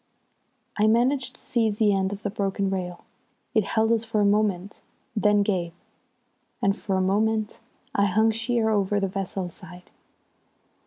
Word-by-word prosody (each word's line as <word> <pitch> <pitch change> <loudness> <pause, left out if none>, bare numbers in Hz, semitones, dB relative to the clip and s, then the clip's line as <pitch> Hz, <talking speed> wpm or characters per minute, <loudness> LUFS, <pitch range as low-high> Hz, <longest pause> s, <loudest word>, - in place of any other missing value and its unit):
I 210 +1 +3
managed 250 +3 +2
to - - -10
seize 220 -4 0
the 210 -2 +3
end 190 0 0
of 205 +1 -7
the 205 - -2
broken 195 -1 -1
rail. 180 -2 -4 0.5
It 220 -3 +3
held 220 +3 +1
us 230 -1 +2
for 225 -1 -1
a 205 - +3
moment, 205 -2 0 0.4
then 210 -1 +3
gave, 180 -5 -1 0.9
and 195 0 +2
for 195 -2 -3
a - - +1
moment 215 +3 0 0.3
I 200 -7 +3
hung 220 +3 +3
sheer 225 0 0
over 205 -1 +1
the 195 - 0
vessel's 190 -2 -4
side. 180 +2 -13
205 Hz, 160 wpm, -25 LUFS, 195-220 Hz, 0.9 s, I